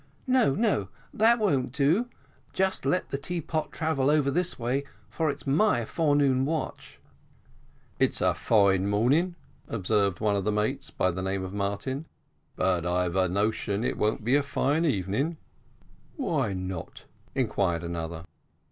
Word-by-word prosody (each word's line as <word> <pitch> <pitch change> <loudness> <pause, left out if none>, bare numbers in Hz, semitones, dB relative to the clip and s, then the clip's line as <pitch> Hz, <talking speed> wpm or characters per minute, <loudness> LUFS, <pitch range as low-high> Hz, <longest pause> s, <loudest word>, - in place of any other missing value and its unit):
"No, 255 - +3
no, 195 - +1 0.2
that 230 +3 +5
won't 145 - +1
do 160 - +2 0.4
just 190 0 0
let 180 - 0
the 140 - -2
teapot 160 0 -3
travel 155 -4 0
over 145 -2 +3
this 180 +4 0
way, 125 +4 -1 0.3
for 160 -2 0
it's 140 - -4
my 140 - +2
forenoon 145 -3 +2
watch." 155 +3 -4 1.0
"It's - - +2
a - - +3
fine 100 -3 +3
morning," 135 - +2 0.3
observed 100 -3 0
one 105 -2 +1
of 100 - 0
the 105 - +1
mates, 105 0 -1
of 90 -1 +2
the 95 - -4
name 95 0 -1
of 95 0 -6
Martin; 105 +9 -3 0.5
"but 90 -3 +1
I've 90 0 0
a 95 -1 +2
notion 105 +2 0
it - - 0
won't 105 0 0
be 120 +4 +1
a 145 - +5
fine 145 +3 0
evening." 135 - 0 0.8
"Why 100 - -1
not?" 95 -2 -6 0.3
inquired 100 -9 0
another. 85 -1 -5
120 Hz, 150 wpm, -27 LUFS, 95-155 Hz, 1.0 s, that